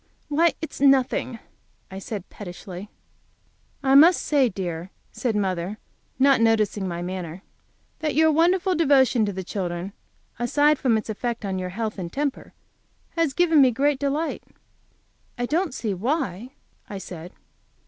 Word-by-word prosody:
"Why, 325 +3 +3
it's 320 - -6
nothing," 265 -3 +3 0.5
I 190 - -6
said, 195 -1 -6
pettishly. 180 0 -9 0.9
"I 265 0 +3
must 325 +6 +7
say, 275 -5 +3
dear," 180 -3 -5 0.2
said 235 -4 -2
mother, 190 0 -1 0.4
not 270 -2 +4
noticing 215 -3 +2
my 175 -1 -4
manner, 180 0 -6 0.6
"that 310 -1 -2
your 315 +1 +5
wonderful 360 +4 +3
devotion 270 -8 +3
to - - -1
the 190 -1 -5
children, 180 0 -4 0.5
aside 290 +5 +3
from 235 -4 +2
its 220 0 -4
effect 235 +1 -4
on 190 -1 -2
your 185 0 -4
health 215 +2 -4
and 170 -2 -5
temper, 285 -1 -3 0.6
has 330 -5 0
given 330 -3 +4
me 260 - +6
great 275 +3 +1
delight." 290 +3 -2 0.9
"I 245 - -1
don't 330 +5 0
see 225 -5 -3
why," 240 - -2 0.4
I 200 - -5
said. 180 -2 -9
235 Hz, 145 wpm, -24 LUFS, 190-285 Hz, 0.9 s, must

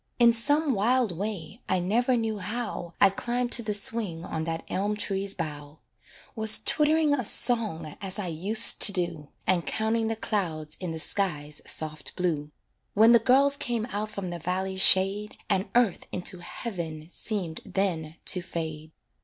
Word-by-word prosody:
In 235 -1 +6
some 290 +5 +1
wild 230 -1 +1
way, 200 +1 -5
I - - +2
never 235 +8 +1
knew 220 -2 -2
how, 205 -4 -5
I 195 - +6
climbed 240 +4 -3
to 235 - +4
the 210 -2 -2
swing 200 -5 -1
on 160 -1 -4
that 165 0 -4
elm 205 +2 -1
tree's 195 -1 -2
bough; 150 -3 -6 0.6
Was 220 -1 +5
twitt'ring 305 0 +3
a 270 -3 0
song 210 -10 +3
as 195 0 -3
I 210 - -3
used 190 +7 +3
to 205 - +8
do, 170 -6 -3 0.2
And 180 -3 +1
counting 220 +1 0
the 225 - -1
clouds 160 -8 -3
in 180 - -4
the 160 - -5
sky's 155 -5 -2
soft 155 -2 -3
blue, 160 -5 -2 0.5
When 220 +3 +6
the 235 - +7
girls 270 +5 +4
came 240 -5 -2
out 210 +1 -3
from 200 -4 -6
the 175 - -6
valley's 190 +3 -1
shade, 195 +3 +4
And 190 +2 0
earth 240 -6 +2
into 180 0 -3
heaven 170 -6 -6
seemed 180 -4 -4
then 180 -6 -2
to 180 - -1
fade. 160 -2 -6
195 Hz, 165 wpm, -27 LUFS, 165-225 Hz, 0.6 s, to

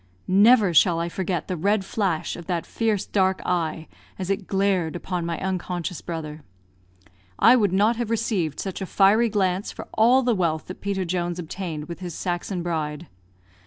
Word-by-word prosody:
Never 205 0 +5
shall 165 +1 +5
I 170 +1 -2
forget 180 -1 -3
the 185 - -2
red 195 +4 +1
flash 190 -6 -1
of 170 - -10
that 175 -2 -2
fierce 220 -4 -1
dark 190 -1 +1
eye 165 -2 -1 0.3
as 190 0 -3
it 195 -1 -2
glared 190 -4 +1
upon 175 -1 -3
my 170 -2 -3
unconscious 180 -2 -3
brother. 155 -2 -6 1.0
I 235 - +7
would 205 -6 +2
not 210 +5 +3
have 235 -2 -2
received 210 -9 -1
such 195 0 -4
a 190 - -3
fiery 210 +6 +4
glance 195 -2 0
for - - -9
all 245 +4 +4
the 245 -1 +2
wealth 165 -6 0
that 185 - -9
Peter 195 -2 -2
Jones 175 0 -2
obtained 165 -3 -5
with 170 0 -7
his 175 -3 -6
Saxon 175 0 -3
bride. 155 -2 -3
185 Hz, 175 wpm, -24 LUFS, 170-200 Hz, 1.0 s, I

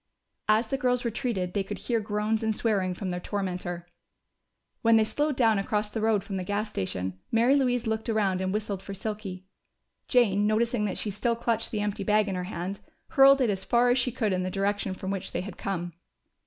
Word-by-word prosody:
As 220 +2 +3
the 270 - -1
girls 250 -2 +1
retreated, 225 -6 -2
they 200 - +1
could 195 - -6
hear 235 -2 -1
groans 210 +1 -1
and 220 -1 0
swearing 195 -6 0
from 185 0 -4
their 180 - -2
tormentor. 180 -3 -4 0.9
When 230 0 +5
they 220 - +6
slowed 290 +6 0
down 225 -5 +3
across 210 +1 -1
the 220 - -3
road 215 -3 +2
from 195 -3 -4
the 185 - -2
gas 205 +3 -2
station, 95 -1 -3
Mary 235 +4 +4
Louise 245 -3 +1
looked 220 +1 -2
around 200 -4 +1
and 190 0 -1
whistled 205 -2 -2
for 200 - -7
Silky. 195 -2 -5 0.6
Jane, 210 -5 +3
noticing 225 +1 +1
that 195 - -2
she 210 - -2
still 230 +4 0
clutched 230 -1 0
the 215 - -2
empty 205 0 -2
bag 210 +1 +3
in 195 - -2
her 180 -1 -3
hand, 185 +1 -4 0.3
hurled 275 -2 +6
it 240 -4 +3
as 190 -1 -3
far 245 +1 +3
as 250 - +3
she 250 +1 0
could 220 -4 0
in 185 - 0
the 185 - -2
direction 195 0 -1
from 190 +1 -4
which 195 -2 -3
they - - -1
had 185 0 -7
come. 175 -3 -3
210 Hz, 215 wpm, -27 LUFS, 190-230 Hz, 0.9 s, they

